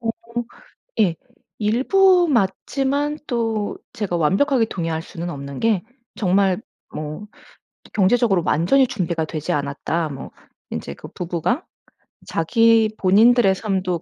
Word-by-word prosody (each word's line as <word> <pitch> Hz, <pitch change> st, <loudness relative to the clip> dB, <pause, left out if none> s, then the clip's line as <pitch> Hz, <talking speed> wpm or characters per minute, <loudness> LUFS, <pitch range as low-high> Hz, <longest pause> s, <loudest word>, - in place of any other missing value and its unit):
어 230 Hz, -, -4 dB, 0.9 s
예. 185 Hz, -6 st, +3 dB, 0.4 s
일부 350 Hz, -, +4 dB
맞지만 275 Hz, +6 st, 0 dB
또 225 Hz, -4 st, -1 dB, 0.2 s
제가 200 Hz, -5 st, -2 dB
완벽하게 230 Hz, -, +2 dB
동의할 165 Hz, -6 st, -3 dB
수는 170 Hz, +1 st, -6 dB
없는 140 Hz, -1 st, -7 dB
게 220 Hz, -5 st, +1 dB, 0.3 s
정말 190 Hz, 0 st, +2 dB, 0.3 s
뭐 155 Hz, +6 st, -6 dB, 0.6 s
또 -, -, -18 dB
경제적으로 205 Hz, -2 st, +3 dB
완전히 215 Hz, -, +3 dB
준비가 170 Hz, -6 st, -2 dB
되지 155 Hz, -1 st, -4 dB
않았다. 145 Hz, +3 st, -2 dB
뭐 135 Hz, -2 st, -8 dB, 0.4 s
인제 -, -, -5 dB
그 -, -, -11 dB
부부가 180 Hz, -, -2 dB, 0.6 s
자기 225 Hz, +6 st, +3 dB
본인들의 210 Hz, +2 st, +5 dB
삶도 185 Hz, -4 st, -2 dB
195 Hz, 245 characters per minute, -21 LUFS, 170-235 Hz, 0.9 s, 본인들의